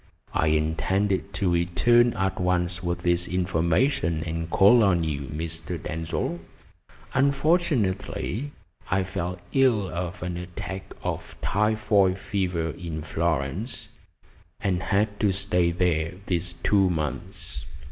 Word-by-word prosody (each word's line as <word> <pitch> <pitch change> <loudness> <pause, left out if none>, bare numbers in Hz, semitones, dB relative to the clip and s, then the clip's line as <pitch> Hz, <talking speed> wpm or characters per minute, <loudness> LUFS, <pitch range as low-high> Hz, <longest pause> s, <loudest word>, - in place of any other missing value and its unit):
I 80 - +2
intended 95 +6 +1
to 95 -1 +1
return 115 +8 +4
at 95 -1 -1
once 90 -1 0
with 85 -1 -2
this 85 0 +2
information 85 - +1
and 80 0 -3
call 105 +7 +6
on 90 -4 +3
you, 70 -4 -3
Mr. 80 +3 -4
Denzil. 80 +2 -3 0.7
Unfortunately, 140 - +1 0.4
I 95 +1 +2
fell 90 -1 -3
ill 125 -7 +3
of 90 +1 -4
an 90 -1 -3
attack 90 +2 -6
of - - -4
typhoid 105 -2 +2
fever 90 -6 -1
in 80 -3 -6
Florence, 80 - -2 0.7
and 90 -2 0
had 105 +3 0
to 105 -2 +3
stay 90 -3 +1
there 85 -1 0
these 90 -1 -1
two 100 -2 +4
months." 75 -5 -4
90 Hz, 115 wpm, -26 LUFS, 85-100 Hz, 0.7 s, call